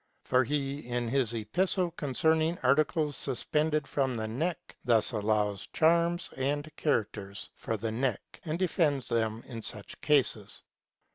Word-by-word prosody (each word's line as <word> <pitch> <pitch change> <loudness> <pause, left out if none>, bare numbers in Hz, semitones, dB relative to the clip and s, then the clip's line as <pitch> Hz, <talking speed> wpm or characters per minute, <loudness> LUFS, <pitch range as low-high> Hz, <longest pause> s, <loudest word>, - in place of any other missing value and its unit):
For 130 0 +3
he, 140 +1 -1
in 120 -1 -1
his 130 -3 +1
epistle 175 - +1
concerning 160 +3 +1
articles 150 +2 +2
suspended 150 +2 0
from 130 -4 0
the 110 0 -2
neck, 160 +10 -3
thus 115 -2 +3
allows 105 -2 0
charms 170 +2 +3
and 145 +3 -2
characters 105 -9 -2
for 110 - -3
the 110 +2 -2
neck, 125 -1 -2
and 160 -1 -2
defends 160 -7 +1
them 115 -1 0
in 115 -3 -7
such 105 -2 -7
cases. 125 -8 +1
135 Hz, 135 wpm, -30 LUFS, 115-155 Hz, -, For